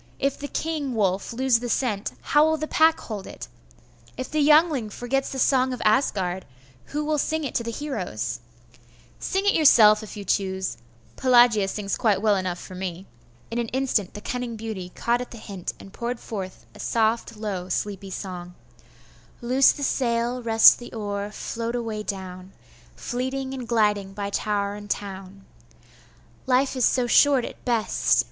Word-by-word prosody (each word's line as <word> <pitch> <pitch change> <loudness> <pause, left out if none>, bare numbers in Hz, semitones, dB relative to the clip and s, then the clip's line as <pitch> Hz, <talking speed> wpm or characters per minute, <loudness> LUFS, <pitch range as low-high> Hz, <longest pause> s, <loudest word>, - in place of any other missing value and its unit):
If 275 0 -1
the 285 - -5
king 295 -5 -3
wolf 195 -3 0
lose 250 0 +2
the 245 0 -5
scent, 220 -5 -1
how 295 0 +4
will 315 0 +2
the 310 - -3
pack 320 +1 +4
hold 210 -4 -6
it? - - -9 0.7
If 255 - -5
the 305 - +1
Yngling 300 -5 +4
forgets 245 +5 -2
the 270 - -6
song 260 -1 +3
of 250 - -6
Asgard, 190 -6 +1 0.4
who 300 +1 -3
will 305 -1 0
sing 315 +2 -1
it 275 - -4
to 235 - 0
the 230 - -4
heroes?' 175 - -4 0.8
'Sing 385 +1 -1
it 405 - +4
yourself, 220 -9 +6
if 215 0 -9
you 200 - -7
choose. 190 0 -1 0.4
Pelagia 240 -5 +5
sings 200 0 -3
quite 215 -6 +2
well 210 0 +3
enough 185 -2 -2
for 185 - -10
me.' 185 0 -5 0.5
In 235 - -1
an 235 - -1
instant 245 -7 -1
the 210 - -7
cunning 245 -1 -4
beauty 215 -5 -6
caught 240 +1 0
at 250 - -6
the 235 - -10
hint, 195 -5 -6
and 195 - -13
poured 240 0 -4
forth 190 -4 -7
a - - -15
soft, 225 0 0
low, 195 -4 -4
sleepy 195 +1 -3
song: 180 -2 -7 0.8
'Loose 255 +2 +4
the 285 - -6
sail, 240 -2 0
rest 225 -1 +7
the 240 - -10
oar, 205 -2 -3
float 230 +2 -4
away 225 -3 -3
down, 190 -2 -6 0.4
Fleeting 260 +2 -3
and 255 -3 -6
gliding 210 -4 +1
by 200 0 -4
tower 200 -1 -1
and 205 0 -9
town; 195 -1 -5 1.0
Life 260 +1 +2
is 255 - +2
so 250 -1 +2
short 270 +1 +5
at - - -10
best! 235 -3 +2
225 Hz, 170 wpm, -24 LUFS, 200-260 Hz, 1.0 s, rest